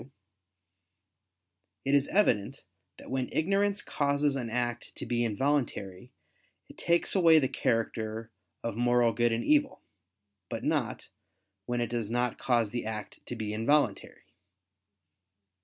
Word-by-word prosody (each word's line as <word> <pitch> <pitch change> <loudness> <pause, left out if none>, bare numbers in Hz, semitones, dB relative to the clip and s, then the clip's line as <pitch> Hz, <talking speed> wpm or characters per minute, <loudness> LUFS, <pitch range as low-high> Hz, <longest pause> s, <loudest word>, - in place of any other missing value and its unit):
2); 130 - -20 1.7
it 135 - +1
is 140 0 +4
evident 130 - +1 0.3
that - - -12
when 130 -1 -1
ignorance 200 +4 +1
causes 145 0 0
an 120 -4 -3
act 120 0 -2
to - - -5
be 120 0 0
involuntary, 120 -4 -1 0.6
it - - -14
takes 170 0 +1
away 170 -4 +6
the 140 -4 +3
character 115 -1 -2 0.3
of 115 -3 -3
moral 120 0 +3
good 120 +1 +2
and 115 +1 -1
evil; 295 -2 +2 0.7
but - - -5
not, - - -1 0.6
when 120 0 -1
it 120 -1 -2
does 115 -3 -2
not 120 0 -1
cause 120 -4 +1
the 120 - -3
act 110 -1 -6
to 120 - -4
be 110 -2 -4
involuntary. 115 0 +1
120 Hz, 135 wpm, -29 LUFS, 115-145 Hz, 1.7 s, away